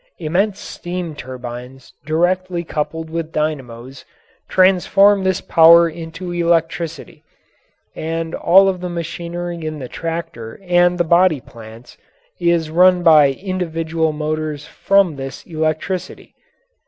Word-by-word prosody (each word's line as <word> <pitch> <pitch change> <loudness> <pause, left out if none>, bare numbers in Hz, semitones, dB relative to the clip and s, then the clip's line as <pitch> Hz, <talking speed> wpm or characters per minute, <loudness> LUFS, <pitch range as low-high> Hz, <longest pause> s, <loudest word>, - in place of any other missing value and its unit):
Immense 190 +6 -1
steam 175 -2 -6
turbines 125 -1 -9
directly 175 +2 0
coupled 160 0 -4
with 165 -1 -4
dynamos 135 -5 -4 0.5
transform 195 +2 +4
this 190 0 0
power 170 0 +6
into 165 +2 -7
electricity, 170 -2 -2 0.7
and 165 0 -4
all 195 +3 +5
of 185 -2 -1
the 180 - -4
machinery 170 0 -5
in 155 0 -4
the 130 -3 -7
tractor 165 -8 -6
and 175 -1 +2
the 175 - +2
body 170 -2 +3
plants 115 0 -14 0.4
is 170 -3 +1
run 180 +1 +4
by 155 -4 +6
individual 165 -2 -2
motors 155 -1 -4
from 195 -6 +1
this 135 0 -8
electricity. 160 +3 -4
165 Hz, 115 wpm, -18 LUFS, 155-175 Hz, 0.7 s, power